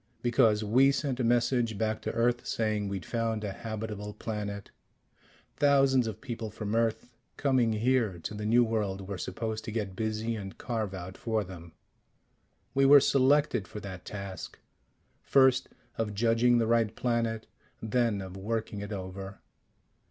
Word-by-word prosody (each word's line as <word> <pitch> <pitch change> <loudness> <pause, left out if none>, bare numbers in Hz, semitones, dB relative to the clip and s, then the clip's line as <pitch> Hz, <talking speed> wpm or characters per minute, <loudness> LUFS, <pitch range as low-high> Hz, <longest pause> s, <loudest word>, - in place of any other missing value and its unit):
Because 115 -3 +3
we 130 +6 +5
sent 140 -2 -2
a - - +1
message 120 -1 +2
back 110 0 -1
to - - -3
Earth 120 +1 +1
saying 110 -2 -1
we'd 95 -4 -4
found 115 -2 -1
a 100 - -2
habitable 105 -1 -5
planet. 105 -2 -5 0.9
Thousands 135 -4 +4
of 110 -1 -6
people 115 -2 -5
from 105 0 -5
Earth, 115 +1 0 0.2
coming 130 -5 +2
here 115 -3 +1
to - - -4
the 105 0 -4
new 120 +2 +5
world 105 -4 -1
we're 95 -1 -6
supposed 110 +2 -4
to - - -4
get 105 -4 -3
busy 110 +2 -2
and 95 -3 -7
carve 110 -5 -3
out 95 0 -8
for 110 -2 0
them. 85 -3 -11 1.0
We 135 - +3
were 140 +1 +9
selected 135 -4 +3
for 105 - -7
that 95 -2 -8
task 100 -3 -7 0.6
first 130 -1 +4 0.3
of 105 -2 -1
judging 115 +2 +3
the 115 - +2
right 115 -1 +2
planet, 115 -2 -1 0.3
then 110 -3 0
of 95 0 -9
working 110 +1 -3
it 100 +1 -6
over. 95 0 -6
110 Hz, 155 wpm, -29 LUFS, 105-120 Hz, 1.0 s, were